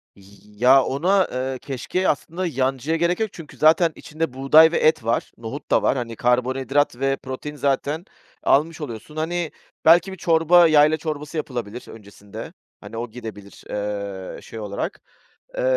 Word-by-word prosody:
Y 100 - -19 0.4
ya, 130 +4 +6
ona, 185 +9 +2
eee, 130 +1 -3
keşkeğe 145 +7 -2
aslında 170 +5 -2
yancıya 135 +1 -1
gerek 170 +2 +1
yok; 220 -1 0
çünkü 165 -4 -12
zaten 160 +2 +4
içinde 155 -3 -4
buğday 150 +5 +6
ve - - +1
et 155 -6 +3
var, 115 +1 -1
nohut 115 +6 -8
da - - +4
var. - - +2
Hani, 115 -2 -4
karbonhidrat 130 +3 +1
ve 135 0 +1
protein 130 +3 -7
zaten 145 +4 -1 0.4
almış 155 +4 +2
oluyorsun. 135 +2 -8
Hani, 165 +1 -2 0.3
belki 170 +3 +6
bir 190 - -8
çorba, 165 +1 +5
yayla 155 0 +5
çorbası 155 0 -5
yapılabilir 120 -6 -5
öncesinde, 105 0 -11 0.3
hani 115 - -9
o 120 +1 -4
gidebilir, 110 -4 -10
eee, 100 -2 -5
şey 115 - -9
olarak. 105 - -4 0.6
Eee, - - -1
140 Hz, 155 wpm, -22 LUFS, 120-160 Hz, 0.6 s, ya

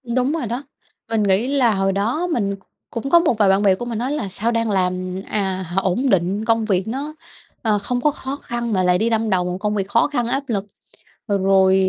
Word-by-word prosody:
Đúng 255 +2 +2
rồi 320 -6 -2
đó. 240 +5 -3 0.5
Mình 225 -2 +1
nghĩ 200 +4 +3
là 260 -6 +3
hồi 195 0 +1
đó 230 - 0
mình 205 - 0
c - - -18 0.3
cũng 245 +3 -4
có 340 - +7
một 310 -10 +1
vài 205 -2 +4
bạn 195 +1 +4
bè 195 -2 +5
của 240 - -6
mình 235 -2 -3
nói 255 +3 -1
là 290 -9 -2
"Sao 215 +5 -1
đang 230 -1 0
làm, 185 -1 -1
à, 190 -2 -1 0.2
ổn 215 +9 0
định, 195 +2 +1
công 225 -1 +2
việc 195 -1 0
nó, 280 +6 -4 0.5
ờ, 215 -3 +1
không 245 +4 -2
có 300 - +3
khó 270 -1 -5
khăn 240 -4 -4
mà 185 -2 +2
lại 180 0 +3
đi 220 +5 +1
đâm 225 -1 +1
đầu 185 -3 +2
vào 180 - -2
một - - -3
công 210 +2 -1
việc 195 -1 -1
khó 230 +3 +3
khăn, 245 -5 -1
áp 270 +3 -1
lực, 205 -5 -1 0.6
rồi 190 -1 +3
215 Hz, 240 wpm, -21 LUFS, 195-245 Hz, 0.6 s, có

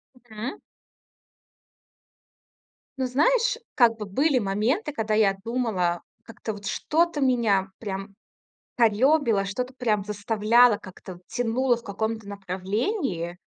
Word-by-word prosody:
Мгм. 240 0 -7 2.4
Ну, 260 - 0
знаешь, 485 - +2 0.2
как 235 -4 +4
бы 210 - -5
были 270 +7 +2
моменты, 225 - 0
когда 225 -6 -2
я 210 -2 +3
думала, 215 -8 -1 0.2
как-то 225 -1 -6
вот 200 -1 -10
что-то 330 +3 0
меня 225 -7 +2
прям 195 -1 -6 0.6
корёбило, 235 -1 +3
что-то 250 +6 -4
прям 215 -6 0
заставляло, 215 +3 +3
как-то 185 -1 -11
тянуло 245 +1 +1
в 235 - -11
каком-то 220 +1 -3
направлении. 195 - -3
225 Hz, 105 wpm, -25 LUFS, 200-255 Hz, 2.4 s, как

